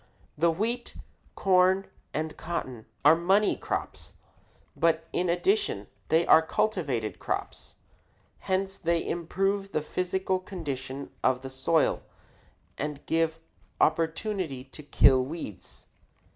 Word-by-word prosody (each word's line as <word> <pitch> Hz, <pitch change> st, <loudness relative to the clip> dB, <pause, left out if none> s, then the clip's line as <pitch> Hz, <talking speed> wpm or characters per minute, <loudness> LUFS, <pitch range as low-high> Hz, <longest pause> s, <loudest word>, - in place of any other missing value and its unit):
The 170 Hz, +3 st, +3 dB
wheat, 225 Hz, +8 st, -2 dB, 0.4 s
corn, 190 Hz, 0 st, +4 dB, 0.3 s
and 155 Hz, 0 st, -3 dB
cotton 130 Hz, -9 st, -5 dB, 0.2 s
are 150 Hz, +2 st, +8 dB
money 190 Hz, +5 st, +3 dB
crops, -, -, -5 dB, 0.6 s
but 165 Hz, -1 st, +1 dB
in 180 Hz, 0 st, 0 dB
addition 390 Hz, -, +1 dB, 0.2 s
they 165 Hz, +2 st, +3 dB
are 160 Hz, -, +7 dB
cultivated 150 Hz, -, -1 dB
crops; -, -, -4 dB, 0.6 s
hence 190 Hz, +1 st, -1 dB
they 170 Hz, -1 st, 0 dB
improve 195 Hz, +4 st, -1 dB
the 155 Hz, -, +1 dB
physical 185 Hz, +3 st, -1 dB
condition 140 Hz, -8 st, -6 dB
of 130 Hz, 0 st, +2 dB
the 135 Hz, -, -6 dB
soil 155 Hz, +5 st, +2 dB, 0.8 s
and 150 Hz, -1 st, -4 dB
give 165 Hz, 0 st, 0 dB, 0.4 s
opportunity 165 Hz, -, 0 dB
to 135 Hz, +3 st, -10 dB
kill 135 Hz, -3 st, +5 dB
weeds. 105 Hz, -, -7 dB
165 Hz, 110 wpm, -28 LUFS, 145-190 Hz, 0.8 s, are